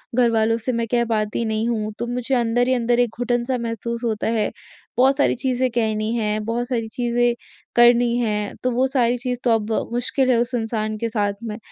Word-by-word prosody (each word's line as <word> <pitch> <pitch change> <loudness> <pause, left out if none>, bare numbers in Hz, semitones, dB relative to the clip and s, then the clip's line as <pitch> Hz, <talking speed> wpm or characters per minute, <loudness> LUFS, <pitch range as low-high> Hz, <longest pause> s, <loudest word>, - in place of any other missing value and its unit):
घरवालों 225 -2 +3
से 230 +3 -2
मैं 230 0 -1
कह 240 -1 +3
पाती 215 0 -1
नहीं 220 +1 -1
हूँ, 215 -2 -1
तो 240 - -2
मुझे 250 +2 -1
अंदर 240 0 +1
ही 260 - +3
अंदर 240 -1 +1
एक 245 -1 +3
घुटन 245 -1 0
सा 255 0 -1
महसूस 235 0 -4
होता 225 -2 -1
है। 220 -1 0 0.5
बहुत 265 +2 +5
सारी 285 - +3
चीज़ें 255 0 0
कहनी 220 -2 0
है, 215 -2 0
बहुत 235 +2 -2
सारी 235 -3 -2
चीज़ें 240 +1 +1 0.4
करनी 240 0 +5
हैं, 210 -3 -1
तो 255 - +1
वो 250 +2 +2
सारी 245 -2 +1
चीज़ 250 0 -3
तो 245 - +3
अब 225 -1 +1 0.2
मुश्किल 250 +2 0
है 240 - +3
उस 245 +1 -3
इंसान 220 -2 -2
के 230 +2 -2
साथ 205 -3 0
में। 215 -2 -5
235 Hz, 210 wpm, -22 LUFS, 225-245 Hz, 0.5 s, बहुत